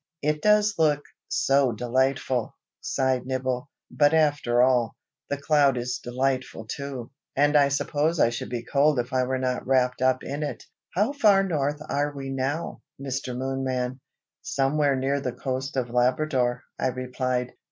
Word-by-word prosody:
"It 150 +1 0
does 210 -1 +3
look 150 -2 +3 0.2
so 135 -3 +2
delightful!" 130 +1 0 0.3
sighed 130 -1 0
Nibble. 130 +1 -2 0.2
"But 145 +1 +3
after 145 -6 +3
all, 125 -3 +2 0.3
the 145 - -1
cloud 140 -2 +3
is 125 +1 -2
delightful 130 -2 -2
too, 135 -1 -6 0.2
and 145 +2 +3
I 145 -1 +6
suppose 150 +3 0
I 120 - +4
should 120 - -5
be 120 -1 -4
cold 145 +3 +3
if 120 +2 -2
I 130 -1 +2
were 130 +1 -1
not 130 -1 -2
wrapped 125 -1 +2
up 130 0 +2
in 140 +2 -4
it. 150 - -4 0.3
How 210 +9 +2
far 205 -8 +5
north 150 -5 -1
are 145 +1 0
we 135 -1 -5
now, 135 +5 -3 0.2
Mr. 135 -2 -4
Moonman?" 130 -1 -2 0.4
"Somewhere 140 +1 +1
near 135 +2 0
the 125 -3 -3
coast 135 +1 -4
of 120 -2 -1
Labrador," 125 0 +1 0.2
I - - +1
replied. 125 0 -2
135 Hz, 155 wpm, -25 LUFS, 125-145 Hz, 0.4 s, I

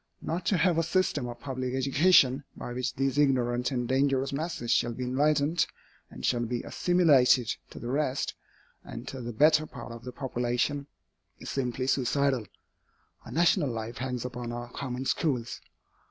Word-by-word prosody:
Not 170 +2 -3
to 195 - +3
have 170 0 +3
a - - +4
system 165 -6 0
of 120 - -7
public 130 -2 -3
education, 135 0 +4
by 120 - -6
which 125 +1 -2
these 135 +1 0
ignorant 125 -3 +2
and 125 -3 -2
dangerous 135 +1 +1
masses 140 -5 -3
shall 120 -1 +2
be 125 - -5
enlightened, 150 +5 +2 0.4
and - - -7
shall 120 -1 +1
be 120 +1 -3
assimilated 140 -9 +3
to - - -12
the 120 - -6
rest, 140 -1 0 0.5
and 120 +2 -8
to 130 - -6
the 120 0 -5
better 155 +6 +4
part, 120 -2 -9
of 115 0 -9
the 125 - -6
population, 125 +2 -1 0.5
is - - -7
simply 130 -1 -2
suicidal. 135 -3 +1 0.8
Our - - -9
national 170 -2 +3
life 115 0 -5
hangs 125 -1 -3
upon 120 -1 -5
our 120 0 -6
common 130 -1 -4
schools. 125 -6 -1
130 Hz, 165 wpm, -28 LUFS, 120-145 Hz, 0.8 s, a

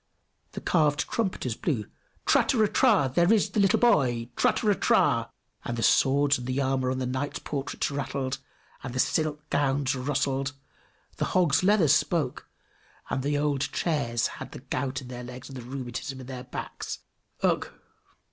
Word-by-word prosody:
The - - -6
carved 150 -4 +2
trumpeters 190 - -1
blew, 115 - -2 0.4
"Trateratra! 205 - +3
There 175 +6 +4
is 220 -3 +3
the - - 0
little 195 -2 +4
boy! 125 - +2
Trateratra!" 210 -4 +2 0.3
and 120 - -3
the 115 - -1
swords 140 +3 +4
and 130 +2 -2
armor 130 -1 +1
on 130 - -1
the 130 - -2
knights' 130 +3 -2
portraits 145 0 -3
rattled, 135 -1 -3 0.4
and 125 -1 -6
the - - -1
silk 150 +1 0
gowns 140 -1 +1
rustled; 135 +1 -1 0.6
the - - 0
hog's 170 -6 +4
leather 195 -4 +4
spoke, 150 -1 +1 0.6
and 135 - 0
the 145 +2 0
old 145 -2 0
chairs 120 -8 0
had - - -6
the - - -7
gout 130 0 -3
in - - -10
their 125 0 -7
legs 125 +2 -9
and 130 -2 -7
rheumatism 130 +2 -5
in 130 - -8
their 130 0 -7
backs: 125 - -6 0.4
Ugh! - - +2
135 Hz, 150 wpm, -27 LUFS, 130-150 Hz, 0.6 s, There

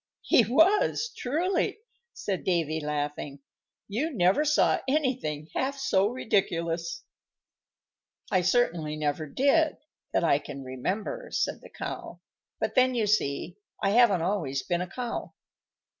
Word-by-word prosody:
"He 240 - +5
was, 355 - +3
truly," 355 - 0 0.3
said 195 -3 -4
Davy, 165 -3 0
laughing; 145 -1 -3 0.5
"you 255 +11 -1
never 195 - +3
saw 305 0 +3
anything 255 - -1
half 275 +1 -1
so 200 -8 +2
ridiculous." 205 - -1 1.3
"I 185 -2 +3
certainly 175 -6 +1
never 155 0 -2
did 285 - +2 0.3
that - - +1
I 150 -4 +4
can 140 -1 -8
remember," 190 - -4
said - - -1
the - - -13
Cow; - - -6 0.4
"but - - -1
then, 255 -1 +4
you 225 -3 +1
see, 175 -4 0 0.3
I 195 - +3
haven't 210 -7 +5
always 160 -9 -1
been 175 -1 -1
a 180 - -3
cow." 240 +3 -5
200 Hz, 130 wpm, -28 LUFS, 155-260 Hz, 1.3 s, He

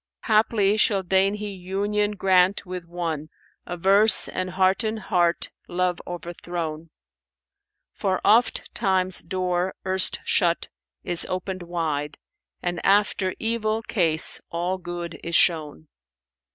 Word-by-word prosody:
Haply 215 -2 +2
shall 200 -2 +2
deign 190 +2 +2
He 210 0 -5
union 200 +3 -2
grant 190 0 +2
with 180 -1 -6
one 165 -3 -4 0.2
* - - -40
Averse, 195 +5 +5
and 185 - -3
hearten 195 +4 +1
heart 175 -5 0 0.2
love 180 0 -1
overthrown; 170 -2 -6 1.0
For 190 -3 -1
ofttimes 195 -4 +1
door 185 -1 -2
erst 190 0 0
shut, 170 -1 +1 0.3
is 175 - +3
opened 185 0 -4
wide, 160 -4 -3 0.2
* - - -57
And 175 0 -3
after 195 -1 +2
evil 225 -1 -1
case 165 -9 +1
all 175 +2 -2
good 175 -3 -6
is 170 0 -3
shown." 150 - +1
185 Hz, 115 wpm, -24 LUFS, 175-200 Hz, 1.0 s, Averse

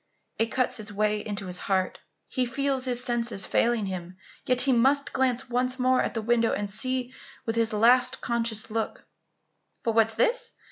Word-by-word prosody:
It 225 - +3
cuts 255 0 -1
its 210 0 -5
way 210 +1 0
into 205 -1 -4
his 180 0 -3
heart. 190 -1 -1 0.3
He 255 -2 -1
feels 270 0 -1
his 250 -1 0
senses 235 -5 +1
failing 235 -3 +1
him, 185 -1 -6 0.3
yet 250 0 +4
he 275 - +3
must 270 +4 +2
glance 260 0 0
once 250 +1 -1
more 255 0 +2
at - - -3
the 225 - -2
window 235 0 +2
and 205 0 -2
see 255 +4 -2 0.3
with 225 - -2
his 230 -1 +2
last 245 +4 +4
conscious 230 -2 -1
look 225 0 -3 0.8
But 230 - +1
what 225 0 +4
is 225 - -7
this! 460 - +2
235 Hz, 185 wpm, -26 LUFS, 215-255 Hz, 0.8 s, yet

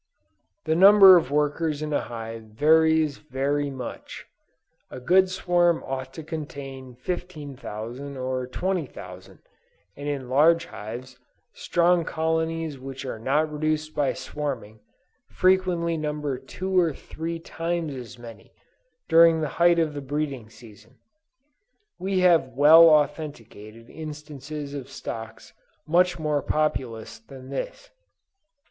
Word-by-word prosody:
The 160 - +1
number 195 +1 +9
of 165 -7 +2
workers 150 +1 0
in 155 0 -3
a - - +2
hive 115 -1 -7
varies 155 +5 +3
very 145 0 -2
much. 130 -3 -8 0.6
A - - -8
good 185 +8 +4
swarm 175 -2 +1
ought 130 0 -5
to 160 - -7
contain 135 -5 -7
15,000 140 - -6
or 130 0 -3
20,000; 130 - -5 0.6
and 145 +1 -7
in 135 -3 -4
large 160 +6 +4
hives, 120 +5 -9 0.3
strong 175 0 +2
colonies 160 -2 -2
which 135 +1 -8
are 120 -4 -5
not 150 +6 0
reduced 155 0 -2
by 145 -2 0
swarming, 125 -8 -5 0.5
frequently 180 -3 +1
number 150 -3 -3
two 185 +8 -5
or 165 -4 +2
three 165 +1 -6
times 165 -1 -3
as 125 -3 -9
many, 120 -1 -13 0.5
during 165 0 +6
the 155 - -1
height 175 0 +6
of 160 -2 +1
the 145 - -5
breeding 140 -4 -4
season. 110 +1 -17 1.0
We 190 0 0
have 165 -8 +3
well 160 +3 +8
authenticated 115 -8 -1
instances 150 -1 -8
of 140 -3 -7
stocks 110 0 -8 0.3
much 180 +3 +2
more 150 -2 -1
populous 125 -8 -2
than 130 +3 -13
this. - - -6
150 Hz, 120 wpm, -25 LUFS, 130-165 Hz, 1.0 s, number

